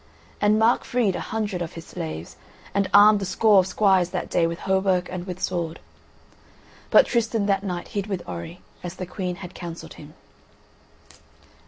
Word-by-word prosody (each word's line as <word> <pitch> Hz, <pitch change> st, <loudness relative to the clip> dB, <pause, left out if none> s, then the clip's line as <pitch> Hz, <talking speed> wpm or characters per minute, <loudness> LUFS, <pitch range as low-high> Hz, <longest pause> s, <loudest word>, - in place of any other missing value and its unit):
And 210 Hz, +1 st, +4 dB
Mark 225 Hz, +2 st, +3 dB
freed 230 Hz, -7 st, 0 dB
a -, -, -3 dB
hundred 210 Hz, -5 st, -3 dB
of 165 Hz, -, -4 dB
his 165 Hz, 0 st, -9 dB
slaves, 80 Hz, +1 st, -6 dB, 0.4 s
and 200 Hz, 0 st, +1 dB
armed 205 Hz, 0 st, +7 dB
a -, -, -2 dB
score 205 Hz, +2 st, +4 dB
of 185 Hz, -, +2 dB
squires 190 Hz, -3 st, +3 dB
that -, -, -4 dB
day 165 Hz, -, +3 dB
with 170 Hz, 0 st, -5 dB
hauberk 190 Hz, -1 st, +1 dB
and 180 Hz, 0 st, -5 dB
with 180 Hz, 0 st, -5 dB
sword. 170 Hz, -3 st, -2 dB, 1.1 s
But -, -, +7 dB
Tristan 225 Hz, -3 st, 0 dB
that 195 Hz, -1 st, +1 dB
night 180 Hz, -3 st, -4 dB
hid 200 Hz, -1 st, -3 dB
with 190 Hz, -4 st, -4 dB
Orri, 90 Hz, -, -7 dB, 0.2 s
as 175 Hz, 0 st, -6 dB
the 185 Hz, -, -5 dB
Queen 180 Hz, 0 st, -4 dB
had 180 Hz, -1 st, -9 dB
counselled 170 Hz, -2 st, -8 dB
him. 150 Hz, +1 st, -13 dB
185 Hz, 175 wpm, -24 LUFS, 175-205 Hz, 1.1 s, armed